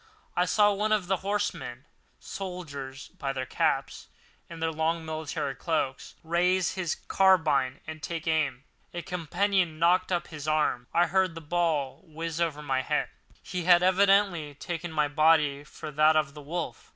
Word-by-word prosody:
I 180 - +3
saw 205 +3 +4
one 210 +2 -1
of 210 -4 +2
the 190 +1 +1
horsemen 195 -10 -3 0.3
(soldiers 145 -9 -7
by 135 -1 -2
their 130 -1 -3
caps - - -1 0.4
and 165 -1 -9
their 165 0 0
long 160 +1 -1
military 155 -3 -3
cloaks) 145 -1 -2
raise 175 +2 +2
his 185 -4 -2
carbine 155 -9 +3
and 155 -1 -7
take 165 0 -4
aim. 150 -5 0 0.3
A 175 - -4
companion 180 0 0
knocked 180 +3 +3
up 175 -1 -1
his 150 -2 -7
arm, 150 -5 +1
and 170 - +4
I - - +3
heard 185 0 +1
the - - -5
ball 160 -4 -1
whizz 165 +1 -4
over 150 -3 -1
my 135 -2 0
head. - - -1 0.3
He 180 -2 -4
had 175 -1 +6
evidently 190 -5 +3
taken 175 +3 -5
my 150 -2 +1
body 150 -2 +3
for 150 - -9
that 155 +2 +4
of 150 -3 +1
the 150 - -10
wolf. 155 -4 -5
165 Hz, 165 wpm, -28 LUFS, 150-180 Hz, 0.4 s, had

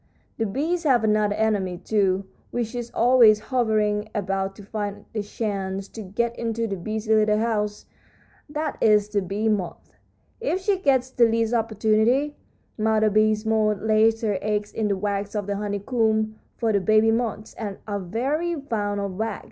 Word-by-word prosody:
The 225 - +1
bees 315 - -1
have 255 -7 +3
another 210 -1 +2
enemy, 205 -5 0
too, 195 0 0 0.2
which 240 -1 -3
is 240 -1 -4
always 235 -3 +6
hovering 215 -3 0
about 195 -1 -2
to 205 - -12
find 205 0 -5
a 215 - -1
chance 195 -2 -3
to 225 - -8
get 230 +4 -2
into 230 0 -1
the 200 -3 -2
busy 215 +4 -2
little 215 -1 +3
house; 210 -2 -1 0.6
that 305 0 -3
is 210 -1 +4
the 205 -1 0
bee 200 +4 -2
moth. 190 -6 -2 0.5
If 450 -6 -1
she 390 0 +1
gets 260 -5 +2
the 240 -2 +4
least 225 0 +1
opportunity 225 +5 +2 0.4
Mother 215 0 +2
Bee 215 +1 +3
Moth 215 -2 +2
lays 220 +1 +3
her 205 -4 0
eggs 210 0 -2
in 220 -1 -1
the 200 -1 0
wax 200 +1 -2
of 205 -2 -1
the 200 0 -2
honeycomb, 215 +1 0 0.2
for 225 -2 +1
the 200 - +3
baby 215 +3 +4
moths 225 -2 -2 0.3
are 205 -1 -3
very 270 - -1
fond 205 -7 -2
of 200 -2 -4
wax. 220 -1 -2
215 Hz, 165 wpm, -24 LUFS, 205-230 Hz, 0.6 s, always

